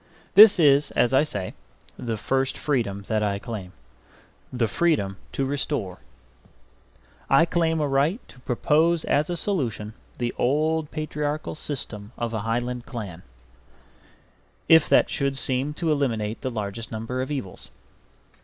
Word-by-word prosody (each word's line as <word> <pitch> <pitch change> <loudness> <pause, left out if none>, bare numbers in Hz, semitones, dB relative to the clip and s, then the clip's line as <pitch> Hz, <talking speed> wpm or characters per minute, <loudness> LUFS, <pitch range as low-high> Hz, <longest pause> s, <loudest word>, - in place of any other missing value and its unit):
This 210 0 +9
is, 145 -2 +5
as 125 - +3
I 130 - +6
say, 100 -11 -3 0.4
the 115 -2 -4
first 135 +4 -1
freedom 110 -9 -1
that 110 +1 -1
I 100 -1 0
claim: 100 -4 -7 0.8
the 125 -3 0
freedom 105 - 0 0.2
to 135 - -1
restore. 135 -8 -2 1.3
I 135 +5 +6
claim 165 -1 +1
a 150 - +1
right 140 - +1
to 125 - -15
propose 155 +6 +1
as 150 +3 +1
a 175 - -1
solution 120 - -2 0.2
the 120 -1 -2
old 155 +3 +1
patriarchal 150 0 -3
system 120 -8 -5
of 115 -1 -3
a 110 - -1
Highland 120 +3 -2
clan, 100 -9 -7 1.5
if 160 -2 +6
that - - +5
should 140 -1 -1
seem 135 +2 -1
to 165 -1 0
eliminate 115 -7 -1
the 130 - -2
largest 110 -1 -5
number 115 +3 -3
of 130 - -4
evils. 135 -11 -6
130 Hz, 140 wpm, -25 LUFS, 110-150 Hz, 1.5 s, This